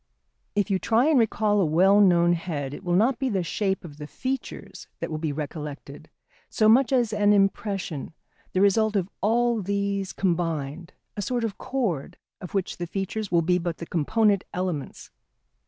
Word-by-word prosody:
] - - -49
If 205 0 0
you 190 - +2
try 230 +6 +2
and 300 -5 +4
recall 215 -2 +2
a - - +3
well 185 +6 +4
known 175 -3 +5
head 150 -5 -4
it 195 - -9
will 175 -1 0
not 235 +7 +2
be 265 -1 0
the 195 -5 0
shape 195 +1 -2
of 150 -3 -11
the 150 -1 -7
features 265 - -5
that - - -4
will 155 - -3
be 155 -1 -2
recollected 150 0 -7 0.4
so 215 - +2
much 240 +4 +5
as 240 -5 +2
an 210 0 +3
impression, 195 -6 -1 0.4
the 185 - +2
result 215 +2 +3
of 195 -1 -1
all 235 +2 +2
these 200 0 -2
combined, 165 -3 -2 0.2
a 205 - -3
sort 240 +4 -1
of 220 -4 -3
chord 225 - -2 0.2
of 180 - -8
which 195 -2 -1
the 175 - -4
features 195 +3 -4
will 170 -1 +3
be 180 +2 +2
but 170 -1 -3
the 170 - -7
component 200 +5 +1
elements. 180 -6 -4
195 Hz, 185 wpm, -25 LUFS, 170-215 Hz, 0.4 s, known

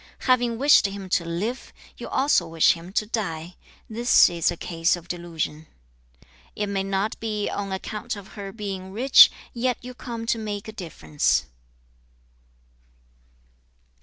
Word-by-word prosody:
Having 245 -3 +2
wished 280 -5 +5
him 195 -1 -7
to 175 - +2
live, 190 +10 -4 0.2
you - - -8
also 265 - +2
wish 165 -1 +4
him 170 +2 -10
to 215 - +1
die. 180 -6 -4 0.3
This 235 -3 +4
is 170 -2 +1
a 175 - -3
case 165 0 0
of 175 -1 -12
delusion. 165 -3 -4 0.6
3. - - -31 0.3
'"It 210 - -2
may 195 -1 -1
not 195 +2 -2
be 210 -2 -2
on 200 -1 -4
account 215 +5 -4
of 200 -2 -11
her 200 -2 -8
being 195 -3 -6
rich, 255 +7 +7 0.2
yet 245 0 0
you 250 +1 -8
come 235 -2 -6
to 230 0 0
make 210 -2 -5
a - - -6
difference."' 75 - -1
200 Hz, 150 wpm, -24 LUFS, 170-225 Hz, 0.6 s, rich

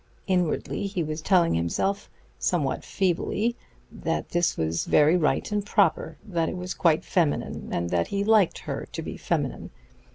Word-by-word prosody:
Inwardly 180 +1 0
he 190 -3 -2
was 155 +1 -4
telling 175 -1 +3
himself, 140 - -1 0.3
somewhat 150 -7 0
feebly, 190 +8 0 0.4
that - - -3
this 175 0 +1
was 80 +1 -1
very 150 +3 +5
right 170 +4 +1
and 205 -1 0
proper; 205 0 +1
that 170 -6 -1
it - - -5
was 180 0 -4
quite 160 -3 +2
feminine, 165 -5 -1
and 85 0 -2
that 85 -1 +1
he 200 0 -1
liked 215 -4 +4
her - - -5
to - - -3
be - - -6
feminine. - - -2
175 Hz, 160 wpm, -26 LUFS, 155-195 Hz, 0.4 s, very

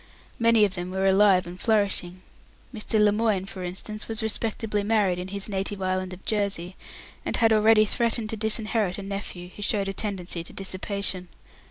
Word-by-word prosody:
Many 230 -2 +5
of 195 - -3
them 180 -1 -5
were 190 +1 -1
alive 195 -1 +5
and 175 +1 -9
flourishing. 195 -5 +1 0.5
Mr. 220 -1 -1
Lemoine, 210 -2 +3
for 190 -1 -7
instance, 200 +4 -5
was 225 0 -2
respectably 220 -1 -1
married 200 -4 +2
in 180 - -5
his 200 0 -2
native 195 0 -2
island 185 0 -1
of 185 +1 -10
Jersey, 200 -4 -1 0.5
and - - -1
had 225 -2 +4
already 215 0 +6
threatened 230 0 0
to - - -2
disinherit 215 -3 0
a 200 - -6
nephew 195 -3 -6
who - - -9
showed 205 -1 +1
a - - -3
tendency 190 -4 -4
to - - -11
dissipation. 190 -1 -3
200 Hz, 175 wpm, -26 LUFS, 185-215 Hz, 0.5 s, already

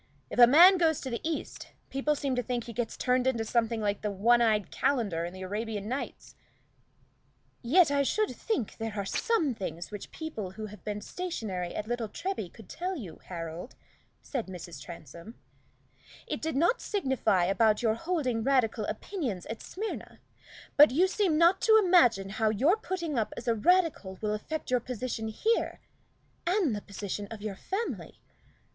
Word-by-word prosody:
If - - -3
a 240 - +10
man 350 +8 +8
goes 320 -3 +3
to 260 - -5
the 235 - -3
East, 320 -1 -4 0.2
people 285 +3 +1
seem 275 -2 -1
to 250 - +1
think 245 0 -2
he 235 - -8
gets 240 0 -3
turned 250 0 +1
into 235 -4 +1
something 230 0 0
like 205 -1 -1
the 210 - -1
one 230 +5 +3
eyed 215 -3 +2
calender 205 -12 0
in 175 - -5
the 185 +1 -8
'Arabian 210 +1 -3
Nights!'" 260 +4 -5 1.3
"Yet 295 +5 +5
I 285 0 +3
should 430 +10 +1
think 400 - -2
there 225 -1 -4
are 200 -2 -2
some 325 - +1
things 175 -4 -6
which 205 -2 -7
people 225 - -6
who 215 +2 -6
have 210 0 -11
been 210 0 -4
stationary 210 - -4
at 210 - -3
Little 240 -2 -2
Treby 330 - -4
could 220 -4 -14
tell 370 +2 -3
you, 195 - -8
Harold," 170 +4 -6 0.5
said 255 -8 -3
Mrs. 175 -5 -8
Transome. 170 - -10 0.9
"It - - -4
did 320 -1 -2
not 345 - +2
signify 265 - +1
about 210 +4 +3
your 220 -2 +3
holding 255 -4 -1
Radical 240 -4 +2
opinions 220 - -4
at 225 - -6
Smyrna; 425 +4 -6 0.6
but 295 +1 +9
you 320 +9 +3
seem 380 -5 +1
not 335 +3 +5
to 440 -1 +6
imagine 260 - +4
how 220 +2 +1
your 270 - +3
putting 345 - -3
up 215 - -2
as 235 - -7
a 235 - +4
Radical 255 - +2
will 210 -1 -1
affect 300 +7 -4
your 250 - +4
position 240 -2 -4
here, 440 - 0 0.7
and 355 - +2
the 205 - -4
position 205 0 -5
of 220 -2 -8
your 210 -2 -3
family. 390 - -4
235 Hz, 175 wpm, -29 LUFS, 210-315 Hz, 1.3 s, a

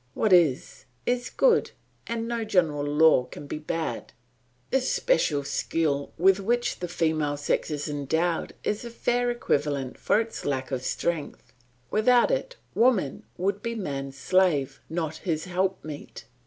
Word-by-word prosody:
What 215 -4 +2
is, 160 -8 +3 0.2
is 245 0 0
good, 485 -2 +3 0.4
and 230 0 -2
no 235 -1 -2
general 170 -9 +1
law 145 -2 +4
can 145 - -10
be 145 - -5
bad. 155 -5 -4 0.6
This 265 -1 +1
special 155 - +2
skill 140 0 -1
with 190 +3 +4
which 240 +5 0
the 180 - -3
female 155 -3 0
sex 145 - -1
is 145 -2 -3
endowed 160 +4 -1
is 210 +2 -1
a 235 - -6
fair 245 +1 0
equivalent 145 - -1
for 210 - +3
its 225 0 -4
lack 135 -2 -2
of 130 -2 -1
strength; 160 +3 -3 0.4
without 245 - +4
it - - -1 0.2
woman 220 - +2
would 200 +2 -1
be 230 +1 -3
man's 140 -9 -4
slave, 170 -4 +2
not 160 -2 -3
his 160 -4 -2
helpmeet. 180 -5 -3
170 Hz, 145 wpm, -26 LUFS, 145-225 Hz, 0.6 s, law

